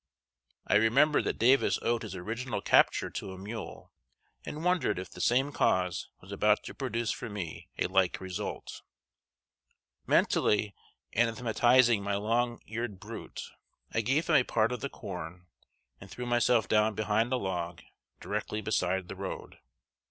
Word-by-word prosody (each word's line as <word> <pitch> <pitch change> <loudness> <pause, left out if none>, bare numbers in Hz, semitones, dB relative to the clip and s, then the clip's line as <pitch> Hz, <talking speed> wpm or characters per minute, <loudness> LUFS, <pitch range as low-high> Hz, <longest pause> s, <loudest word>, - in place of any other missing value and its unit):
I - - +4
remembered 130 +8 +4
that - - -1
Davis 130 +4 +4
owed 120 0 +1
his 105 -4 -6
original 110 +6 -3
capture - - +3
to 95 - -5
a - - -9
mule, 105 +4 -8 0.5
and 155 +3 -6
wondered 180 - +2
if 90 0 -6
the - - -8
same 135 +4 +2
cause 90 -8 +1
was - - -13
about - - +2
to - - -8
produce 115 0 -2
for - - -5
me 95 -6 -6
a - - +1
like 95 -1 +2
result. 95 -1 -5 1.3
Mentally 105 -1 +2 0.4
anathematizing 120 0 +3
my 100 0 -1
long 120 +3 0
eared 115 -3 -4
brute, - - -8 0.5
I 115 - +2
gave 135 +8 +1
him 155 -3 +5
a 130 - +4
part 115 -1 +1
of 125 - -4
the 140 - -3
corn, 90 -3 -8 0.5
and 95 - -12
threw 125 - -6
myself 120 -1 +3
down 105 0 +3
behind 110 +3 +1
a 130 - +2
log, 90 -5 -4 0.4
directly 105 - -3
beside 95 -3 0
the - - -7
road. 95 0 -7
110 Hz, 150 wpm, -30 LUFS, 95-120 Hz, 1.3 s, him